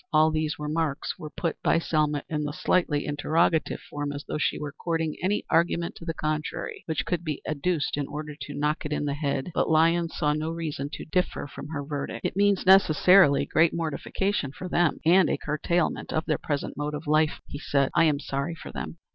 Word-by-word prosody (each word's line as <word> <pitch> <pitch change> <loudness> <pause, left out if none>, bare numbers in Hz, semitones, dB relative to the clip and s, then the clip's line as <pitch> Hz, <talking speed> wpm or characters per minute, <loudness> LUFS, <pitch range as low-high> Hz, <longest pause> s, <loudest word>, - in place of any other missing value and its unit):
All 155 0 +5
these 155 -1 -1
remarks 150 -1 -2
were 155 - -6
put 165 +2 -3
by - - +3
Selma 150 -3 0
in 150 -1 -2
the 145 0 -3
slightly 175 -4 +1
interrogative 155 +2 +1
form, 145 0 -4
as 145 0 -6
though - - -3
she - - +1
were 150 -1 -5
courting 160 +1 -2
any 195 +4 0
argument 170 0 +2
to 165 - -10
the 165 - -2
contrary 155 0 -3
which 160 -2 -1
could 175 -2 -1
be 155 -4 -3
adduced 155 0 -1
in 145 -2 -2
order 150 0 -6
to 145 0 -8
knock 150 +2 0
it 150 - -5
in 150 - -1
the 140 - -1
head. 140 +1 -2
But - - +1
Lyons 165 +1 +3
saw 150 0 +2
no 155 +1 -2
reason 155 -4 -4
to - - -6
differ 180 +3 -1
from 140 0 -9
her 145 -2 -4
verdict. 145 -1 -4
"It - - -1
means 200 -1 +2
necessarily 185 -4 +6
great 160 +1 +3
mortification 165 0 -2
for 185 - -7
them 175 -2 +2
and 180 +2 +5
a - - +1
curtailment 160 +3 -1
of 155 - -1
their - - 0
present 145 -2 -3
mode 150 +1 -2
of 150 - -7
life," 155 +1 +2
he 145 - -7
said. 140 -2 +1
"I 165 - +5
am 150 -3 +2
sorry 140 +3 -3
for - - -9
them." - - -6
155 Hz, 210 wpm, -26 LUFS, 145-165 Hz, -, necessarily